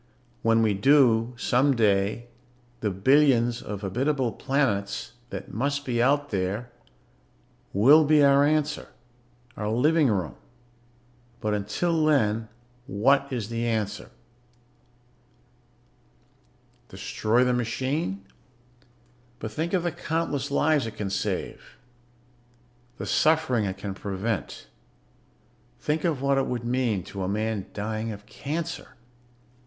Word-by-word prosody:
When 115 0 +3
we 110 -2 +2
do, 120 +1 +4
someday, 115 -4 +2 0.5
the 110 - -1
billions 120 +3 +3
of 100 -2 -6
habitable 130 +5 0
planets 115 -8 -1 0.2
that - - -7
must 140 +4 -1
be 120 -2 0
out 145 +3 +2
there 100 +5 -2 1.0
will 140 +11 +6
be 150 0 +4
our 140 0 +5
answer... 150 0 0 0.7
our 105 -1 -3
living 150 +7 +3
room. 95 -9 -1 1.1
But 110 -2 -1
until 155 - 0
then, 115 -7 +2 0.4
what 140 +4 +2
is 115 -5 -3
the 115 0 -2
answer? 110 -2 -2 2.8
"Destroy 115 +4 0
the 125 0 +2
machine? 125 - -2 1.1
But 110 -2 -6
think 160 +8 -3
of 180 -3 +1
the 175 - 0
countless 150 -4 -2
lives 145 -2 +2
it 110 - -8
can 105 -2 -4
save, - - -4 1.2
the - - -5
suffering 155 -8 +2
it 95 -1 -4
can 100 0 -5
prevent. 100 +1 -4 1.1
Think 150 +1 -1
of 150 -6 -1
what 140 0 +3
it 135 - -1
would 120 -2 -3
mean 120 -6 0
to 100 - -7
a 95 - -1
man 105 0 -2
dying 110 +2 -3
of 105 0 -9
cancer. 150 +6 -5
120 Hz, 115 wpm, -26 LUFS, 105-140 Hz, 2.8 s, will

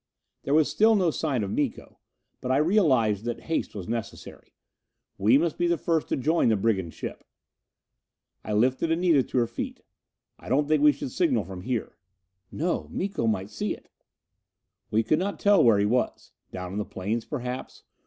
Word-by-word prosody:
There 140 - 0
was 155 -1 +4
still 220 +1 +4
no 180 -5 +2
sign 140 -8 -1
of 100 - -3
Miko. 140 -1 -3 0.4
But 125 - -2
I 130 - +3
realized 135 - +3
that 120 -1 -3
haste 165 -8 -3
was 95 -4 -6
necessary. 115 -2 -6 0.6
We 110 +7 +5
must 165 +2 -1
be 175 - +2
the 170 0 +2
first 160 0 0
to - - 0
join 155 0 +2
the 110 - +3
brigand 95 -5 -1
ship. - - -7 1.2
I 105 - -4
lifted 130 +9 +2
Anita 165 -3 +3
to 130 - -4
her 120 - +4
feet. - - -6 0.6
"I - - -11
don't 145 +3 +2
think 155 -1 +2
we 150 0 +7
should 135 -2 -6
signal 135 - +1
from 90 0 -8
here." 120 +3 -3 0.5
"No. 170 +3 -2
Miko 190 - -2
might 100 -2 -1
see - - -2
it." - - -21 1.0
We 110 +1 +2
could 155 - +2
not 200 +2 -3
tell 205 -5 +5
where 115 -4 +5
he 100 - +2
was. 125 +4 -1 0.2
Down 90 -1 -6
on 100 - -3
the - - 0
plains, 105 +5 -3
perhaps? 125 -2 -6
130 Hz, 185 wpm, -26 LUFS, 110-160 Hz, 1.2 s, we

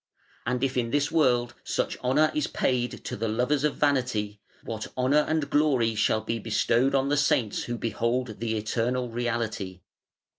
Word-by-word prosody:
And 125 +1 0
if 130 -1 0
in 120 -2 0
this 145 +3 +1
world 125 -6 +2
such - - -1
honour 145 +5 +3
is 150 - 0
paid 125 -1 -1
to - - -3
the 115 +2 -2
lovers 125 +6 +1
of 150 -2 +1
vanity, 125 -8 0 0.2
what 110 -1 -5
honour 130 +4 +3
and 155 -2 0
glory 135 -7 +3
shall 110 0 +1
be 115 +2 -3
bestowed 120 +5 +1
on 135 0 +2
the 145 - +2
Saints 145 -7 +1
who 120 0 -3
behold 115 0 -2
the 110 -1 -1
Eternal 120 +3 -1
Reality.' 115 -6 -3
120 Hz, 170 wpm, -27 LUFS, 115-140 Hz, 0.2 s, honour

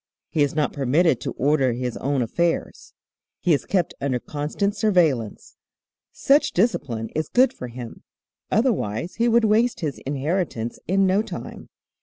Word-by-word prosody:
He 155 - 0
is 145 -1 +1
not 150 -2 0
permitted 140 +1 +2
to - - -4
order 135 -3 +2
his 125 0 -3
own 135 -1 0
affairs. 170 +8 -2 0.4
He 180 - +2
is 145 - 0
kept 185 -3 0
under 135 -2 0
constant 155 - -2
surveillance. 170 - 0 0.5
Such 285 +2 +2
discipline 140 - 0
is 155 -1 -3
good 255 +2 +4
for 125 - -7
him, 120 -1 -9 0.5
otherwise 185 - 0
he 235 +1 +2
would 235 -1 +4
waste 225 +2 +2
his 150 -4 -3
inheritance 140 -4 -2
in 195 +2 +3
no 190 +2 +3
time. - - -8
155 Hz, 150 wpm, -23 LUFS, 130-200 Hz, 0.5 s, good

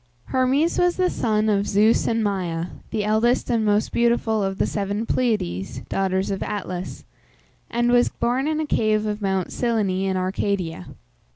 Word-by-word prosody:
Hermes 265 +6 +2
was 355 -1 +2
the 365 -1 +2
son 215 -1 0
of 205 -1 +1
Zeus 215 +3 +3
and 225 -1 +1
Maia, 180 -4 -2 0.2
the 210 - -1
eldest 225 +4 +1
and 230 -2 +2
most 210 0 +1
beautiful 235 -2 +1
of 195 -1 -2
the - - +2
seven 205 +2 -2
Pleiades 210 - -1
(daughters 190 0 0
of 195 - -3
Atlas), 185 -3 -5 0.6
and 240 +1 +1
was 245 0 +4
born 255 +4 -1
in 310 0 0
a 315 - 0
cave 215 -6 +1
of 210 0 -3
Mount 190 -2 -1
Cyllene 205 -6 0
in 190 - 0
Arcadia. 185 - -2
215 Hz, 165 wpm, -23 LUFS, 195-235 Hz, 0.6 s, was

